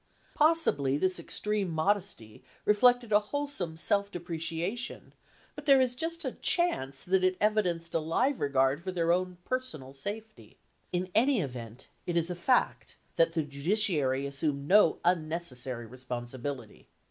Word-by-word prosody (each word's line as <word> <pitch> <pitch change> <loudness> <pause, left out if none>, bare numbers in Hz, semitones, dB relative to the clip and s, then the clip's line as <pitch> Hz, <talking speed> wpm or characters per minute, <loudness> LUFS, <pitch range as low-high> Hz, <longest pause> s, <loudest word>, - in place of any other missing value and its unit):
Possibly 295 - +3
this 185 +4 0
extreme 210 -3 -2
modesty 165 - -2 0.2
reflected 245 +2 +4
a 205 - +6
whole 285 +8 -3
some 180 - -4
self 200 +4 +1
depreciation, 170 +5 -4 0.4
but 300 0 -10
there 275 -1 +7
is 255 -1 +2
just 330 +6 -4
a - - -1
chance 140 - +1
that 185 +1 +1
it 185 0 +2
evidenced 180 -6 0
a 165 - +2
live 240 - 0
regard 135 +1 +2
for 185 +1 -4
their 170 -2 +1
own 180 0 0
per 255 - 0
sonal 145 - -8
safety. 215 +9 -7 0.3
In 180 +1 -2
any 250 +3 +3
event, 125 - -6 0.2
it 175 -1 0
is 170 +1 0
a - - -3
fact 245 +9 0 0.2
that 165 0 +3
the 160 -1 0
judiciary 145 -3 0
assumed 140 0 -2
no 195 -3 +5
unnecessary 155 -8 -1
responsibility. 125 0 -7
175 Hz, 145 wpm, -29 LUFS, 140-210 Hz, 0.4 s, there